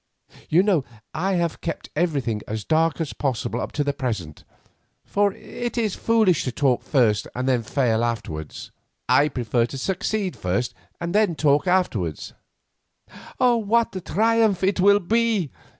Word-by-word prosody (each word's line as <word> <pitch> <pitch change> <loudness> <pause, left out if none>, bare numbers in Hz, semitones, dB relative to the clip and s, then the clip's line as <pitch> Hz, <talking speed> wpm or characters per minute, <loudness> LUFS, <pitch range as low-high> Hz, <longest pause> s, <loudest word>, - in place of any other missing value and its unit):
You 170 +4 +4
know 190 -9 +2 0.3
I 190 +5 -1
have 170 -3 -1
kept 165 - -5
everything 140 -10 0
as 110 0 -4
dark 160 +1 +2
as 160 -3 -3
possible 125 -3 -2
up - - -4
to 145 - 0
the 145 0 -1
present, 110 - -4 0.6
for 205 0 +1
it 240 +3 -6
is 220 -4 0
foolish 220 -8 +2
to 130 - -1
talk 130 -1 +1
first 115 -7 +2
and 125 -1 0
fail 115 -2 +1
afterwards. 80 -10 -4 0.4
I 145 - +4
prefer 120 -3 0
to 135 - -7
succeed 190 +5 -2
first 95 +7 -2 0.3
and 170 0 -3 0.2
talk 145 +3 +2
afterwards." 115 - 0 1.0
"What 235 -2 +2
a 185 - -3
triumph 220 +1 +2
it 195 0 +1
will 200 +2 +5
be!" 220 - +1
160 Hz, 145 wpm, -23 LUFS, 120-200 Hz, 1.0 s, will